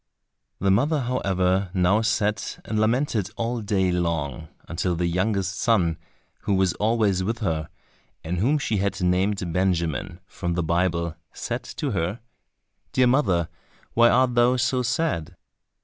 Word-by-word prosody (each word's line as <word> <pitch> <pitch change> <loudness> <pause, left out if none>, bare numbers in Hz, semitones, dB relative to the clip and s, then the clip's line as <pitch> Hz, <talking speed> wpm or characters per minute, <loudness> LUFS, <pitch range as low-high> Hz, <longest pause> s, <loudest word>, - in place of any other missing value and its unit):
The 100 0 +1
mother, 140 +9 +2
however, 95 -6 0
now 95 +4 +3
sat 105 -2 -1
and 110 - -1
lamented 110 -2 +1
all 115 0 -2
day 95 -3 +1
long, 85 -3 -2 0.2
until 90 +2 -1
the 85 +1 -1
youngest 95 +2 0
son, 90 -10 +2 0.4
who 100 - 0
was 95 -2 +2
always 105 -4 +1
with 115 +5 -1
her, 80 -7 -2 0.5
and 85 +2 -2
whom 135 +10 +3
she 115 -7 -1
had 100 +1 -1
named 90 0 0
Benjamin, 90 -1 -1
from 85 -2 -4
the 90 - 0
Bible, 85 0 0 0.2
said - - -4 0.2
to - - -1
her, 90 +8 -2 0.7
"Dear 130 - +4
mother, 100 - +2 0.5
why 120 0 +6
art 125 +1 +3
thou 120 +1 +4
so 125 +1 +1
sad?" 125 - -1
95 Hz, 145 wpm, -24 LUFS, 90-115 Hz, 0.7 s, why